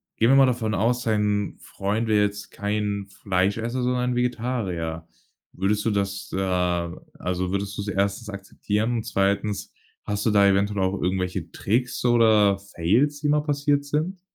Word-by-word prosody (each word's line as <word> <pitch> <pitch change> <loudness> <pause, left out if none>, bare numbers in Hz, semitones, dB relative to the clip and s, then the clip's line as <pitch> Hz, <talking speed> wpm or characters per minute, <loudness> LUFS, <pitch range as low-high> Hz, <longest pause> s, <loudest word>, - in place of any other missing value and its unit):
gehen 115 - +3
wir 135 - +6
mal 135 0 +7
davon 115 -4 0
aus, 120 +5 +1
dein 105 -2 0
Freund 105 +4 -2
wäre 105 -1 +4
jetzt 100 0 -5
kein 100 -1 -2 0.2
Fleischesser, 100 +6 0
sondern 125 0 0
Vegetarier. 110 -10 -2 0.5
Würdest 100 +3 0
du 115 - +2
das, 100 -2 -2
äh - - -1 0.8
also, 90 0 -2
würdest 100 +1 -2
du - - -2
es 100 - -6
1. 100 +3 -1
akzeptieren 105 +3 -2
und 110 - -3
2. 100 -1 -1 0.3
hast 105 0 -3
du - - +4
da 100 -1 +5
eventuell 100 0 +2
auch 95 +1 -1
irgendwelche 90 -1 -1
Tricks 125 +4 -1
oder 110 -4 +4
Fails, 105 - +1
die 150 - 0
mal 150 0 +3
passiert 145 -1 0
sind? 155 +6 -2
105 Hz, 160 wpm, -24 LUFS, 100-120 Hz, 0.8 s, mal